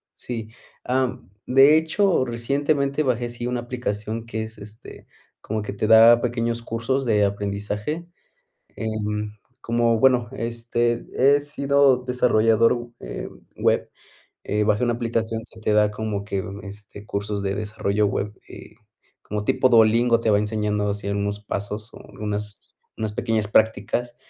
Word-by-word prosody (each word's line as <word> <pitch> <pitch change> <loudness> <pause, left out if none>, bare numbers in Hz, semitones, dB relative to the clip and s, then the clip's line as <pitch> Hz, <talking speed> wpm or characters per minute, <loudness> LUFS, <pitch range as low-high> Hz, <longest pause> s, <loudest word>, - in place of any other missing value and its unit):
Sí, 115 -3 -6 0.3
am, 125 -5 -1 0.2
de 135 +4 +7
hecho, 160 +1 +2
recientemente 140 +4 0
bajé 125 -4 0
sí, 120 0 -5
una 125 -1 -2
aplicación 115 -2 -4
que 110 -1 -3
es, 110 0 -10
este, 105 +2 -12 0.3
como 110 0 -3
que 105 - -5
te 105 +1 -1
da 115 +1 +8
pequeños 115 -1 -1
cursos 115 +4 -2
de 105 -3 +3
aprendizaje. 105 +10 -3 0.7
Em, 105 -1 -3 0.3
como 115 0 +2
bueno 125 -3 +3
este, 120 0 -1
he 140 +2 +4
sido 140 -2 +3
desarrollador, 120 -1 +2
eh, - - -6 0.3
web. - - +1 0.5
Eh, 105 0 0
bajé 105 +2 +2
una 120 -1 +2
aplicación 115 -1 -2
que 110 - -14
te 110 -1 0
da 105 0 +4
como 105 -1 -3
que 100 -1 -2
ve 95 - -7 0.2
este, 105 0 -11
cursos 100 0 -3
de 100 0 -2
desarrollo 105 0 -1
web, 100 +1 -2 0.2
eh, - - -12 0.5
como 105 0 -4
tipo 130 - +3
Duolingo 115 0 +5
te 115 - +1
va 105 - +5
enseñando 105 -1 -1
así 100 0 -3
unos 100 0 -2
pasos, 105 +2 -5
o - - -10 0.2
unas 105 0 -4 0.4
unas 110 -1 -3
pequeñas 110 -2 -1
prácticas 110 +3 +1
115 Hz, 145 wpm, -23 LUFS, 105-120 Hz, 0.7 s, da